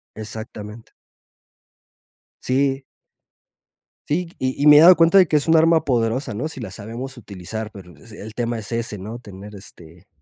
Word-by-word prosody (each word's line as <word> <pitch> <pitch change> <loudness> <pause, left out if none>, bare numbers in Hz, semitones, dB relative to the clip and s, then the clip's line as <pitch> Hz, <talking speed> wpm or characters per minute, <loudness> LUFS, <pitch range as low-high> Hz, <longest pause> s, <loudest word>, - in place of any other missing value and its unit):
Exactamente. 110 0 -9 1.5
Sí. 135 +1 0 1.3
Sí, 165 +3 -1
y 130 +2 -2
y - - +4
me 150 0 +9
he - - +9
dado 175 +4 +8
cuenta 165 +3 +4
de 185 -3 +6
que 155 - 0
es 150 +2 +1
un 165 - +5
arma 165 0 +4
poderosa, 120 0 -1
¿no? 120 +9 -3
Sí 150 -5 -9
la 100 -5 -7
sabemos 115 +6 -8
utilizar, 110 0 -7
pero 90 -3 -13
el 110 -1 -11
tema 120 -1 -2
es 105 0 -8
ese, 115 -2 -3
¿no? 110 +5 -8
Tener, 105 -2 -12
este, 90 -2 -15
115 Hz, 165 wpm, -21 LUFS, 105-140 Hz, 1.5 s, me